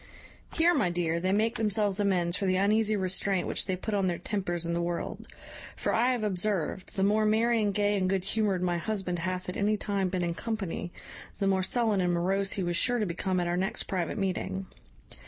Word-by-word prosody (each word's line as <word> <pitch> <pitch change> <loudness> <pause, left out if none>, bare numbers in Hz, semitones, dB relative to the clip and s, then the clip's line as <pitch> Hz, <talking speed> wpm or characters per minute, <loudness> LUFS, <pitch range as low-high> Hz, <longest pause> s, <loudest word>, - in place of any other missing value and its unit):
Here, 340 +2 +4
my 275 - +2
dear, 170 -1 0
they 185 +2 0
make 225 +4 +1
themselves 210 -2 +1
amends 180 -4 +1
for 195 - -1
the 185 - +2
uneasy 215 +3 +2
restraint 190 -1 +1
which - - -1
they 185 - 0
put 210 +4 -4
on 195 -2 +2
their 175 -1 0
tempers 175 -5 -2
in 170 - -1
the 170 - 0
world; 170 0 -4 0.5
for - - -1
I 245 +3 +3
have 240 -3 -2
observed, 190 -1 -2
the 195 - +1
more 210 +2 +3
merry 225 +2 +3
and 205 -1 +1
gay 205 +1 +1
and 185 -1 +1
good 190 -1 0
humoured 195 -2 0
my 175 -1 0
husband 190 -3 -2
hath 185 +1 -3
at 180 - -4
any 210 +1 +2
time 200 -2 -1
been 180 -1 -1
in 170 -1 -1
company, 195 -4 -4 0.5
the 200 - -1
more 190 -1 +2
sullen 215 0 +1
and 180 -1 +1
morose 195 +3 +1
he 195 - -1
was 175 -1 0
sure 245 +5 +2
to 215 - 0
become 185 +1 -1
at 175 - 0
our 175 0 0
next 190 +1 0
private 180 -3 -2
meeting. 190 -1 -2
195 Hz, 220 wpm, -29 LUFS, 180-210 Hz, 0.5 s, Here